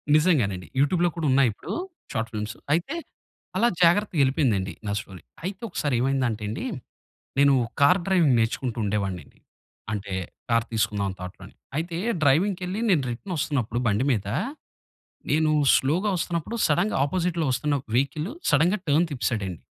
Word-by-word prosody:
నిజంగానండి. 115 - +2
యూట్యూబ్‌లో 175 +4 +3
కూడా 165 -2 -2
ఉన్నాయి 135 -2 +5
ఇప్పుడు - - -7 0.4
షార్ట్ 115 -1 -2
ఫిల్మ్స్. 105 0 -4 0.2
అయితే 175 - 0 0.6
అలా 235 - +4 0.2
జాగ్రత్తగా 175 -1 +3
ఎళ్ళిపోయిందండి 115 - +1
నా - - -1
స్టోరీ. 95 -5 -10 0.2
అయితే 190 +3 -4
ఒకసారి 145 -6 -1
ఏమైందంటే 130 -4 0
అండి, 200 - -4 0.7
నేను 140 0 +6 0.3
కార్ 180 +7 +6
డ్రైవింగ్ 170 -9 +4
నేర్చుకుంటూ 120 +1 -1
ఉండేవాడినండి. 100 -6 -3 0.5
అంటే 100 -2 -4 0.4
కార్ 115 0 +2
తీసుకుందాం 105 -2 0
అని 95 - -6
థాట్‌లోని. 95 +1 -9 0.2
అయితే 165 +1 -2 0.3
డ్రైవింగ్‌కెళ్లి 180 +7 +2
నేను 165 -7 +4
రిటర్న్ 175 +11 -5
వస్తున్నప్పుడు 120 -5 -1
బండి 105 +6 +2
మీద, 100 -4 -1 1.0
నేను 155 +1 +3 0.2
స్లోగా 170 +10 +1
వస్తున్నప్పుడు 170 +6 -2
సడెన్‌గా 175 +6 +1
ఆపోజిట్‌లో 170 0 -1
వస్తున్న 145 +3 0
ఒక - - -39
వెహికల్ 150 +6 -1 0.2
సడెన్‌గా 170 +8 +3
టర్న్ 155 +4 +4
తిప్పేశాడండి. 105 - -2
140 Hz, 135 wpm, -25 LUFS, 110-170 Hz, 1.0 s, నేను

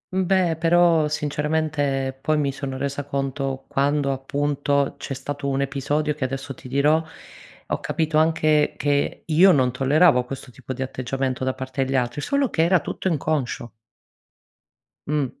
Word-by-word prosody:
Beh 185 -3 +2
però, 165 -1 +4
sinceramente 150 -2 -1
poi 155 +1 +1
mi 140 -2 +1
sono 135 -1 -5
resa 140 +1 -3
conto, 135 -1 -3
quando 140 0 +1
appunto 140 +1 0
c'è 135 - -5
stato 140 +2 -5
un 135 0 0
episodio 145 +2 -1
che 145 -3 -5
adesso 135 +1 -4
ti 130 - -13
dirò, 150 +4 +2 0.6
ho - - -2
capito 155 -1 0
anche 155 -1 +2
che 145 -1 0
io 175 +4 +6
non 130 -4 +3
tolleravo 135 +1 +4
questo 130 0 -8
tipo 130 +1 -9
di 130 - -3
atteggiamento 130 0 -3
da 130 0 -1
parte 130 +1 -3
degli 135 +1 -2
altri, 125 +3 0
solo 280 - 0
che 160 - +1
era 180 +1 +4
tutto 170 - -4
inconscio. 145 -7 -1 1.4
Mh. 150 -2 +1
140 Hz, 150 wpm, -23 LUFS, 135-155 Hz, 1.4 s, io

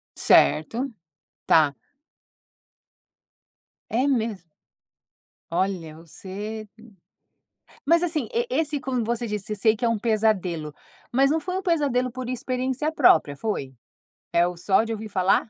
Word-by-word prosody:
Certo. 225 - +3 0.6
Tá. 150 -3 +4 2.2
É 250 +5 +1
mesmo? 230 -6 0 1.1
Olha, 170 -3 -2
você 200 +6 -7 1.2
mas 335 +3 +4
assim, 315 -8 -1
e 470 +1 +1
esse, 310 - 0
como 255 -3 -2
você 235 +1 -2
disse, 210 0 -3
eu - - -4
sei 220 +2 +3
que 215 - -9
é - - +3
um 230 - +1
pesadelo, 200 -9 0 0.4
mas 270 +3 +3
não 320 - +2
foi 365 +3 -3
um - - -2
pesadelo 280 -8 +1
por 255 0 -6
experiência 255 +4 -2
própria, 165 - +4
foi? 140 -7 -3 0.6
É 170 +1 +4
o 180 -1 -6
só 190 +4 +2
de 225 - -5
ouvir 220 -1 -5
falar? 190 +3 +2
225 Hz, 130 wpm, -24 LUFS, 190-265 Hz, 2.2 s, Tá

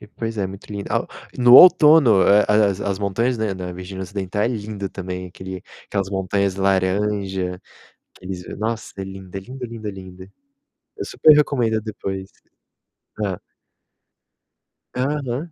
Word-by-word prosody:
pois 115 -1 -4
é, 100 - 0
muito 95 +1 -9
lindo. 100 -1 -5
Ah, - - 0 0.3
no 125 -1 +6
outono, 150 - +7
eh, 105 +1 +5
as 105 -2 +3
as 100 -1 -2
montanhas 115 +5 0
da 110 -3 -1
da 90 -1 -6
Virgínia 95 +1 -7
Ocidental 100 +1 -3
é - - +2
lindo 105 -4 -4
também, 90 -1 -6
aquele 95 +1 -9 0.2
aquelas 100 -2 -2
montanhas 95 0 -1
laranja, 95 -1 0 0.6
aqueles 90 -1 -7
nossa, 110 +1 -3
é 95 - -4
lindo, 95 -1 -10
é - - -2
lindo, 125 +6 -8
lindo, 115 -2 -7
lindo. 95 -1 -11 0.7
Eu - - -4
super 155 - +5
recomendo 120 -7 +1
depois. 95 -3 -6 0.9
Hã. 100 -4 -2 1.6
Aham. 140 +3 -2
100 Hz, 140 wpm, -21 LUFS, 95-115 Hz, 1.6 s, outono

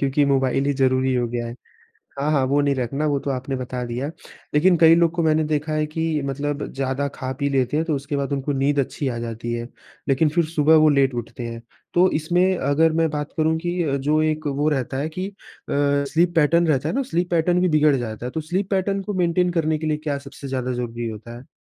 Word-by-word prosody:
क्योंकि 140 +1 +2
मोबाइल 135 -1 +1
ही 145 - +2
ज़रूरी 130 0 +2
हो 120 -1 +1
गया 120 0 -3
है। 115 - -6 0.6
हाँ, 145 +2 0
हाँ, 135 -3 +2
वो 140 +2 +2
नहीं 140 -1 +2
रखना 135 +4 -2
वो 145 -1 +1
तो 140 - -3
आपने 130 +1 -3
बता 125 -1 -4
दिया। 125 +5 -3 0.4
लेकिन 175 +4 +5
कई 165 0 +7
लोग 170 -1 +3
को 170 - 0
मैंने 155 -1 +2
देखा 150 0 -1
है 155 0 0
कि 160 +2 -3 0.2
मतलब 145 +1 -2
ज़्यादा 135 +1 -1
खा-पी 130 +2 -3
लेते 135 0 +1
हैं, 160 - +1
तो 155 - 0
उसके 140 +1 -4
बाद 140 0 -2
उनको 140 +1 -1
नींद 140 +1 +1
अच्छी 140 +1 -3
आ 120 -2 -3
जाती 115 +1 -5
है। 120 0 -4 0.4
लेकिन 140 +3 +3
फिर 170 +2 +1
सुबह 155 0 +3
वो 155 0 +6
लेट 135 -2 +3
उठते 120 0 -6
हैं। 115 0 -7 0.3
तो 180 +2 +5
इसमें 180 +4 +2
अगर 155 +3 +2
मैं 165 - +3
बात 150 -1 -4
करूँ 160 0 +2
कि 175 +2 -3 0.2
जो 155 +2 +2
एक 155 0 -1
वो 145 +1 0
रहता 135 -3 -1
है 145 +3 -1
कि 185 +4 -4
अ, 200 - -14 0.4
स्लीप 145 +5 +1
पैटर्न 165 +2 +4
रहता 145 0 +1
है - - -2
ना, 275 - +1
स्लीप 180 -9 -2
पैटर्न 175 +1 +2
भी 180 - +3
बिगड़ 155 -2 +4
जाता 115 -2 -5
है। 125 - -4
तो 160 - -2
स्लीप 185 +6 -2
पैटर्न 195 0 0
को 205 +2 -4
मेंटेन 175 +1 +2
करने 160 -2 0
के 155 - -4
लिए 155 -1 +1
क्या 140 -1 0
सबसे 140 0 -9
ज़्यादा 130 -1 -2
ज़रूरी 120 -1 -4
होता 115 +2 -8
है? 130 - -15
145 Hz, 235 wpm, -22 LUFS, 130-160 Hz, 0.6 s, कई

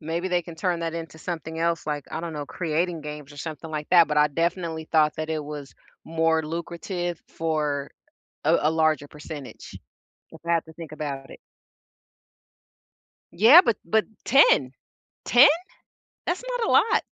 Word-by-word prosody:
Maybe 165 +3 -3
they 180 -1 +1
can 170 0 -10
turn 175 0 -1
that 165 -1 -2
into 165 -1 -7
something 160 -1 -5
else 165 -1 0
like, 145 -2 -3
I 160 - -4
don't 170 -1 -5
know, 145 -1 -4
creating 170 +1 -2
games 150 -1 -8
or 145 - -14
something 160 +1 -7
like 150 -1 -4
that, 170 -3 +6
but 150 0 +1
I 150 0 +5
definitely 165 +1 -2
thought 155 -1 +4
that 155 0 -4
it 155 -1 -2
was 145 -1 -8 0.3
more 160 0 +1
lucrative 170 +2 -4
for 150 -3 -2 0.5
a - - +4
a 155 - +3
larger 155 -2 +1
percentage. 150 -2 -10 0.7
I've 170 -1 +2
to 160 - -14
think 165 -1 -10
about 140 -3 -5
it. - - -11 2.0
Yeah. 235 - +9
But 230 -4 +2
but 220 0 +1 0.2
10. 485 - +5 0.5
10? 250 +4 +8 0.8
That's 360 +7 -2
not 460 - -1
a - - +1
lot. - - +4
160 Hz, 160 wpm, -25 LUFS, 150-170 Hz, 2.0 s, Yeah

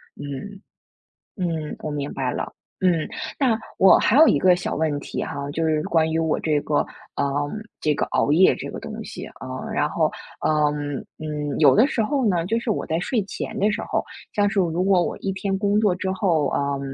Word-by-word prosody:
嗯。 145 +9 -7 0.8
嗯， 165 -5 -2
我 155 - -4
明 145 -1 -3
白 130 -2 -1
了。 - - -4 0.3
嗯， 175 -4 +2 0.3
那 245 -5 +3 0.2
我 190 - +7
还 245 - +3
有 315 - +8
一 - - +4
个 185 -1 +5
小 180 - -3
问 155 -2 0
题 - - -4
哈， 140 0 -5
就 165 +2 0
是 155 -1 +1
关 160 -1 +2
于 - - 0
我 160 -1 +1
这 150 -2 +1
个 145 0 +1 0.4
嗯， 140 - +2 0.5
这 155 - +2
个 - - 0
熬 - - +1
夜 175 +5 +6
这 - - -6
个 - - -7
东 - - -7
西， - - -7
呃， - - -6
然 - - +1
后 - - +1 0.4
嗯 150 -2 +1 0.2
嗯， 150 -2 -3
有 155 - +6
的 230 +6 +6
时 235 - 0
候 265 +2 0
呢， 175 -4 +1
就 225 +4 +1
是 240 -2 -2
我 - - -1
在 160 +1 -1
睡 225 +4 0
前 220 +3 -5
的 205 +2 +3
时 220 - -2
候 - - 0 0.3
像 205 -1 +3
是 200 - +1
如 175 0 0
果 190 -2 +4
我 - - -2
一 195 - -2
天 195 0 -2
工 205 +1 +2
作 205 -4 +3
之 190 0 -2
后 175 -7 +1
嗯， 140 -1 -1
170 Hz, 225 characters per minute, -23 LUFS, 150-200 Hz, 0.8 s, 有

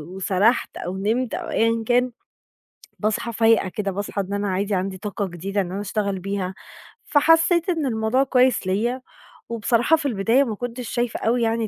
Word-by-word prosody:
وسرحت 195 +5 +1
أو 185 +2 -4
نِمت 225 +5 -1
أو - - -4
أيًا 230 0 +1
كان 250 0 +2 0.9
باصحى 220 +2 -1
فايقة 225 -3 +3
كده، 200 +1 -3
باصحى 200 +1 -3
إن 195 +1 -4
أنا 200 0 -1
عادي 200 +2 -1
عندي 190 0 -2
طاقة 205 -1 -3
جديدة 195 +4 -3
إن 180 -2 -3
أنا 200 - -3
أشتغل 200 -1 -2
بيها، 190 0 -3 0.5
فحسيت 325 +4 +4
إن 325 -5 0
الموضوع 225 +3 +1
كويس 255 -6 +2
ليَّ، 235 +7 0 0.5
وبصراحة 235 +6 +2
في 305 - -5
البداية 230 +4 +2
ما 225 -5 -3
كنتش 245 +1 -5
شايفة 240 -1 -1
أوي 235 +2 +1
يعني 225 0 0
220 Hz, 170 wpm, -23 LUFS, 195-245 Hz, 0.9 s, فحسيت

